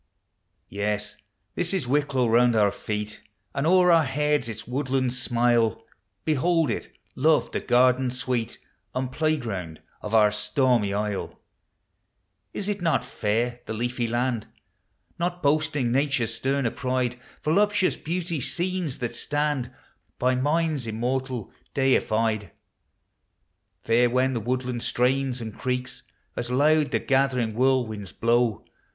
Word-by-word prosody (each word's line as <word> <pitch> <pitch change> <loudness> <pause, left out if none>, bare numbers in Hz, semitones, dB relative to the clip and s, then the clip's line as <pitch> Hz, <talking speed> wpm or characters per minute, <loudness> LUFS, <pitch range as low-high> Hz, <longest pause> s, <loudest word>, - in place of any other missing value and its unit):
Yes, 105 +1 -2 0.4
this 180 +2 0
is 160 -10 -2
Wicklow; 140 -2 +1
round 120 +1 +4
our 105 -2 +4
feel 105 +1 -3 0.5
And 140 +2 0
o'er 180 0 +5
our 165 -1 +6
heads 150 -1 0
its 110 0 -7
woodlands 130 -1 -1
smile; 120 -2 +2 0.4
Behold 160 -1 +2
it, - - -4 0.2
love— 155 +3 +3
the - - -1
garden 125 +1 +3
Bweel 125 -2 -2 0.4
And 130 0 -2
playground 115 - -2 0.2
of 105 +1 -2
our 105 -1 +6
stormy 115 0 +1
isle. 105 0 -3 1.1
Is 200 - -5
i't 205 -2 -2
not 165 -2 +2
fair—the 115 +2 -2
leafy 120 +1 -1
land? 120 -1 -1 0.7
Not 175 0 -2
boasting 150 -4 +1
Nature's 135 -4 +1
sterner 130 +1 0
pride, 125 -2 -1 0.2
V0luptU0U.S 200 +4 +2
beauty, 170 -2 -3
scones 175 -1 -2
that 120 -2 -3
slaml 145 0 -1 0.5
By 130 +1 +2
minds 145 0 0
immortal 125 +1 -2 0.2
deified. 110 -6 +1 1.3
Fair 120 +2 +3
when 130 +2 +2
the 120 - -1
woodland 125 +1 -2
strains 130 +1 +1
and 110 -2 -6
creaks 125 0 -3 0.3
As 120 0 -3
loud 150 +3 +3
the - - +1
gathering 130 -4 +1
whirlwinds 115 -5 0
bio*. 115 -1 +1
125 Hz, 120 wpm, -25 LUFS, 115-145 Hz, 1.3 s, our